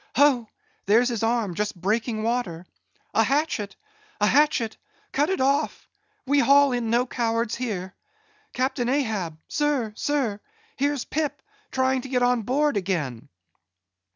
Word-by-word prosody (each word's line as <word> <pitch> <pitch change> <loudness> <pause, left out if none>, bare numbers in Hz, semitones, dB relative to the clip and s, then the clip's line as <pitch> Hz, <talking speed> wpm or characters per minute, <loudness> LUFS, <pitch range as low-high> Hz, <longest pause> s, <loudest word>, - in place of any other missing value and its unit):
Ho! 255 -5 +4 0.4
there's 235 +5 +4
his 235 -3 -2
arm 225 -4 +1
just 205 0 -3
breaking 215 +3 -1
water. 220 -8 -2 0.5
A - - +4
hatchet! 275 -8 0 0.4
a 210 - +3
hatchet! 270 -3 +3 0.4
cut 290 +4 +1
it 380 - 0
off—we 290 +4 -1
haul 280 0 +5
in 240 -2 -1
no 240 +2 +3
cowards 230 -2 -1
here. 200 -7 -3 0.6
Captain 255 -1 -1
Ahab! 220 - -1
sir, 285 -8 0
sir! 260 -9 -1 0.4
here's 285 - 0
Pip, 305 -1 -2 0.3
trying 260 0 +1
to 265 - -9
get 250 -1 +1
on 245 -1 +3
board 275 +3 +1
again." 165 - -2
245 Hz, 130 wpm, -25 LUFS, 215-280 Hz, 0.6 s, haul